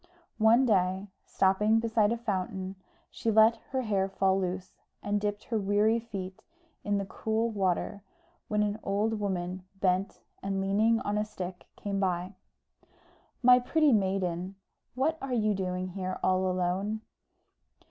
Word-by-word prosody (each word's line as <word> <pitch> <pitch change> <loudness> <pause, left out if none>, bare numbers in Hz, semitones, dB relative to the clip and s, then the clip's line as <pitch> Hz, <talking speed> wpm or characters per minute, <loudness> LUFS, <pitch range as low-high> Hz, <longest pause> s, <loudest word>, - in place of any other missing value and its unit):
One 230 +4 +5
day, 190 -2 +1 0.2
stopping 210 +4 +3
beside 225 -2 +2
a 235 - 0
fountain, 190 -3 -3 0.4
she 230 - -2
let 220 +1 +6
her 260 -1 -1
hair 195 -4 0
fall 190 0 +2
loose, 185 0 -4 0.3
and 205 0 0
dipped 205 0 -2
her 225 -2 -1
weary 205 +3 +2
feet 195 -5 -7 0.4
in 205 0 0
the 200 - -2
cool 220 +4 -1
water, 195 0 -1 0.5
when 210 0 +1
an 210 +1 -2
old 210 +2 0
woman, 185 -2 -3 0.2
bent, 185 +1 0 0.2
and 195 0 -2
leaning 215 +4 +2
on 205 +1 -1
a - - +1
stick, 185 -4 -7
came 200 -1 -3
by. 185 0 -1 1.1
"My 250 0 +8
pretty 300 +3 +3
maiden, 190 -2 0 0.4
what 315 +5 0
are 270 -1 -3
you 215 -2 +2
doing 185 -1 -2
here 185 0 -4
all 185 0 +2
alone?" 185 +4 -1
200 Hz, 145 wpm, -29 LUFS, 185-220 Hz, 1.1 s, My